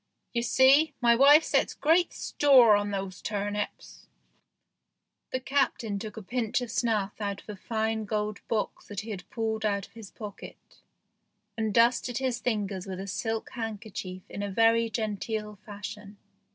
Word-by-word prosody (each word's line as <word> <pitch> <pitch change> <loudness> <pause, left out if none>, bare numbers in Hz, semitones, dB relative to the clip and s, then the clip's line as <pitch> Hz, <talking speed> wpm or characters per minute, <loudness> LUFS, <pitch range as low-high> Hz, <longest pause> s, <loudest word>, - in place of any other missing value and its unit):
You 235 - +1
see, 270 +6 +5
my 235 -1 +5
wife 285 +5 +7
sets - - +1
great 330 +3 +3
store 255 -7 +5
on 205 0 0
these 195 -2 -4
turnips." 205 0 -4 1.2
The 255 - -2
captain 255 -6 0
took 215 0 -7
a 220 - -6
pinch 230 +2 -1
of 245 -3 -5
snuff 220 -5 0
out 200 -2 -3
of - - -19
a 210 - -5
fine 220 +2 -2
gold 210 0 -2
box 220 -2 -2
that 205 -2 -5
he 215 -1 -5
pulled 220 +3 -3
out 200 -2 0
of - - -23
his 225 -4 -10
pocket, 210 -3 -11 0.8
and 220 -2 -1
dusted 235 +2 +3
his 255 -2 -1
fingers 205 -6 -2
with 190 -1 -5
a 195 - -5
silk 225 +3 -3
handkerchief 210 -5 -6
in 200 - -6
a 205 - -2
very 230 +3 +3
genteel 215 -1 -3
fashion. 205 0 -8
220 Hz, 155 wpm, -28 LUFS, 205-235 Hz, 1.2 s, wife